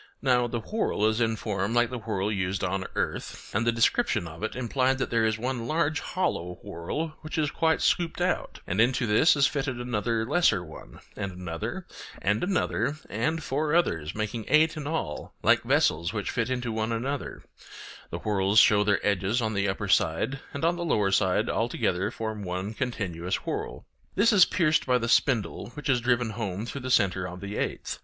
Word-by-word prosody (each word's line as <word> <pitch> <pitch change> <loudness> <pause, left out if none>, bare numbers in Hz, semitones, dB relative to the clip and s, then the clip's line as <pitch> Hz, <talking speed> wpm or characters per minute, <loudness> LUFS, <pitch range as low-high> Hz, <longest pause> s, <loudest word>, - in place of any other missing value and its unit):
Now 125 -2 +3
the 120 -1 -3
whorl 210 - -1
is 110 +2 +2
in 115 -1 +2
form 100 +1 -2
like 120 0 +3
the 125 - -4
whorl 105 -2 -2
used 95 -1 -1
on 95 0 -1
earth; - - -4
and 110 +3 0
the - - +5
description 115 - +2
of 80 +2 -10
it 110 - -3
implied 130 +1 +1
that 130 - -2
there 115 -1 +3
is 110 0 0
one 120 0 -3
large 155 -1 +1
hollow 90 - -2
whorl 100 - -4
which 155 0 -6
is 150 -2 +1
quite 160 -1 +1
scooped 170 -1 +1
out, 180 0 -1
and 95 +5 +1
into 125 +1 +2
this 110 +10 +5
is 140 -1 +4
fitted 135 -4 -1
another 115 -1 -1
lesser 125 - +2
one, 80 - -12
and 100 -2 -4
another, 85 -2 -5 0.3
and 105 +3 0
another, 180 -5 0
and 155 +9 -1
four 150 +4 0
others, 80 - +1
making 110 +1 -3
eight 155 +1 +4
in 150 -2 -5
all, 150 - -4
like - - +5
vessels 85 +5 +2
which 105 -3 -2
fit 115 0 -1
into 125 -2 -2
one 110 +1 -1
another; 130 +5 -3 0.7
the - - -4
whorls 100 -1 0
show 105 -1 +7
their 100 -1 +1
edges 100 +3 +1
on 110 -2 -1
the 100 0 0
upper 100 +2 -3
side, 95 +9 +1
and 140 +3 -2
on 170 +1 +2
their 175 - -3
lower 105 -11 +2
side 95 -1 +2
all - - 0
together 95 +3 0
form 110 -2 -5
one 95 +2 -4
continuous 95 -7 -2
whorl. - - -4 0.3
This 215 +3 +4
is 190 -3 +8
pierced 155 -5 +1
by 125 -1 +4
the 115 -1 -2
spindle, 120 -3 +1
which 150 0 -5
is 125 -2 +3
driven 120 -1 +1
home 105 -1 -4
through 140 +3 -6
the 130 - -4
centre 95 -6 +2
of 90 0 -8
the 100 +2 -6
eighth. - - -3
115 Hz, 195 wpm, -27 LUFS, 100-135 Hz, 0.7 s, is